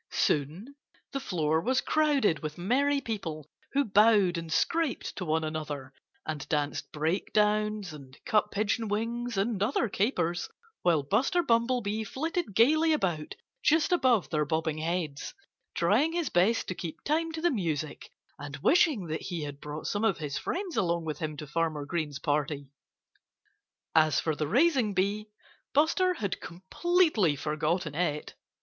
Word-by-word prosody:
Soon 160 Hz, -, -1 dB, 0.4 s
the 275 Hz, -, -2 dB
floor 160 Hz, -, 0 dB
was 255 Hz, +8 st, +1 dB
crowded 285 Hz, -, +2 dB
with 155 Hz, -1 st, -6 dB
merry 275 Hz, +10 st, +1 dB
people 175 Hz, -, -5 dB, 0.2 s
who 280 Hz, 0 st, +2 dB
bowed 205 Hz, -3 st, +4 dB
and 165 Hz, -1 st, -5 dB
scraped 325 Hz, -, 0 dB
to 185 Hz, -, -4 dB
one 160 Hz, -1 st, 0 dB
another 150 Hz, -4 st, -5 dB, 0.3 s
and 150 Hz, -3 st, -5 dB
danced 150 Hz, -2 st, -1 dB
breakdowns 210 Hz, +4 st, 0 dB
and 135 Hz, -2 st, -12 dB
cut 210 Hz, -1 st, +2 dB
pigeon 215 Hz, +2 st, -1 dB
wings 230 Hz, +2 st, -2 dB
and 200 Hz, 0 st, 0 dB
other 235 Hz, +3 st, +1 dB
capers, 175 Hz, -5 st, 0 dB, 0.3 s
while 165 Hz, -5 st, +3 dB
Buster 260 Hz, -, +2 dB
Bumblebee 230 Hz, -4 st, +1 dB
flitted 285 Hz, -, -3 dB
gaily 310 Hz, +8 st, +5 dB
about 175 Hz, -, -1 dB, 0.3 s
just 315 Hz, +4 st, +3 dB
above 255 Hz, -, +3 dB
their 155 Hz, -2 st, +2 dB
bobbing 160 Hz, +1 st, -1 dB
heads, 160 Hz, -3 st, -3 dB, 0.4 s
trying 320 Hz, +3 st, +2 dB
his 340 Hz, -4 st, -1 dB
best 195 Hz, +7 st, +2 dB
to -, -, -1 dB
keep 170 Hz, -3 st, -7 dB
time 325 Hz, +2 st, 0 dB
to 325 Hz, -, -4 dB
the 345 Hz, -, +3 dB
music 160 Hz, -, -3 dB, 0.3 s
and 145 Hz, 0 st, -6 dB
wishing 280 Hz, -, +3 dB
that 160 Hz, -1 st, -3 dB
he 175 Hz, -4 st, -4 dB
had 145 Hz, -1 st, -7 dB
brought 150 Hz, +1 st, -6 dB
some 205 Hz, +1 st, -1 dB
of 220 Hz, -5 st, +2 dB
his 145 Hz, -3 st, -4 dB
friends 360 Hz, -, -3 dB
along 170 Hz, -2 st, +1 dB
with 155 Hz, -2 st, -4 dB
him 155 Hz, -1 st, -4 dB
to 150 Hz, -, -6 dB
Farmer 155 Hz, -1 st, -1 dB
Green's 150 Hz, -3 st, -3 dB
party. 145 Hz, -1 st, -2 dB, 1.2 s
As 155 Hz, -1 st, +4 dB
for 160 Hz, -2 st, -1 dB
the 150 Hz, 0 st, -2 dB
raising 250 Hz, -, +3 dB
bee, 200 Hz, +3 st, 0 dB, 0.5 s
Buster 360 Hz, +5 st, +3 dB
had 200 Hz, -, -3 dB
completely 210 Hz, -, +1 dB
forgotten 155 Hz, +2 st, -1 dB
it. 150 Hz, -2 st, -2 dB
185 Hz, 150 wpm, -29 LUFS, 155-245 Hz, 1.2 s, gaily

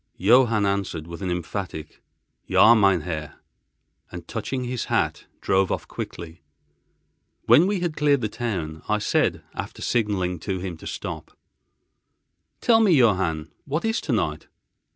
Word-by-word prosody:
Johann 115 Hz, +1 st, +4 dB
answered 100 Hz, -5 st, -2 dB
with 85 Hz, +2 st, -9 dB
an 95 Hz, -, -2 dB
emphatic, 90 Hz, -2 st, -5 dB, 0.5 s
"Ja, 115 Hz, -, +6 dB
mein 100 Hz, -6 st, +4 dB
Herr," 75 Hz, -3 st, -5 dB, 0.8 s
and, 90 Hz, -2 st, -9 dB
touching 125 Hz, +3 st, -3 dB
his 125 Hz, -1 st, -3 dB
hat, -, -, -1 dB, 0.2 s
drove 95 Hz, 0 st, +2 dB
off -, -, -3 dB
quickly. 85 Hz, 0 st, -7 dB, 1.0 s
When 170 Hz, +5 st, +6 dB
we 200 Hz, -3 st, -1 dB
had 170 Hz, -3 st, -2 dB
cleared 145 Hz, -3 st, +2 dB
the 110 Hz, -, 0 dB
town, 90 Hz, -9 st, -4 dB
I -, -, +3 dB
said, -, -, 0 dB
after -, -, -6 dB
signalling 95 Hz, -6 st, 0 dB
to 95 Hz, +3 st, -3 dB
him 90 Hz, -1 st, -5 dB
to -, -, -10 dB
stop: -, -, -7 dB, 1.2 s
"Tell 225 Hz, -2 st, +5 dB
me, 205 Hz, -5 st, +5 dB
Johann, 95 Hz, -, +2 dB
what 150 Hz, +8 st, -2 dB
is 225 Hz, 0 st, 0 dB
tonight?" -, -, -2 dB
100 Hz, 140 wpm, -24 LUFS, 85-125 Hz, 1.2 s, Ja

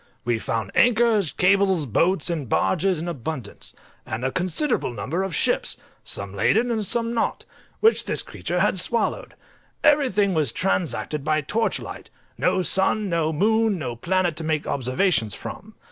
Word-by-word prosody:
We 120 Hz, -2 st, 0 dB
found 110 Hz, -3 st, -3 dB
anchors, 225 Hz, -7 st, +3 dB
cables, 190 Hz, -3 st, +2 dB
boats, 170 Hz, -, +1 dB
and 150 Hz, -8 st, -4 dB
barges 185 Hz, -, +1 dB
in 165 Hz, +3 st, -5 dB
abundance, 140 Hz, -7 st, -6 dB, 0.3 s
and 110 Hz, +3 st, -4 dB
a 130 Hz, -, 0 dB
considerable 185 Hz, -, 0 dB
number 145 Hz, +9 st, -3 dB
of 190 Hz, -5 st, -3 dB
ships, -, -, +1 dB, 0.3 s
some 100 Hz, -1 st, -6 dB
laden 220 Hz, -, +2 dB
and 220 Hz, -2 st, -1 dB
some 230 Hz, +3 st, +1 dB
not, 230 Hz, -, -1 dB, 0.4 s
which 445 Hz, +1 st, +4 dB
this -, -, +2 dB
creature 175 Hz, 0 st, -3 dB
had 190 Hz, -2 st, +2 dB
swallowed. 235 Hz, -, -1 dB, 0.5 s
Everything 255 Hz, -10 st, +3 dB
was 155 Hz, -7 st, +2 dB
transacted 155 Hz, -5 st, -1 dB
by 155 Hz, +1 st, +1 dB
torch 220 Hz, +10 st, -1 dB
light; -, -, -9 dB, 0.3 s
no 185 Hz, -, +1 dB
sun, 190 Hz, +3 st, +2 dB
no 165 Hz, -2 st, 0 dB
moon, 220 Hz, +5 st, +2 dB
no 125 Hz, -7 st, -4 dB
planet, 175 Hz, +6 st, 0 dB
to 165 Hz, -, -2 dB
make 155 Hz, -1 st, -1 dB
observations 130 Hz, -, 0 dB
from. -, -, -9 dB
175 Hz, 155 wpm, -23 LUFS, 145-205 Hz, 0.5 s, which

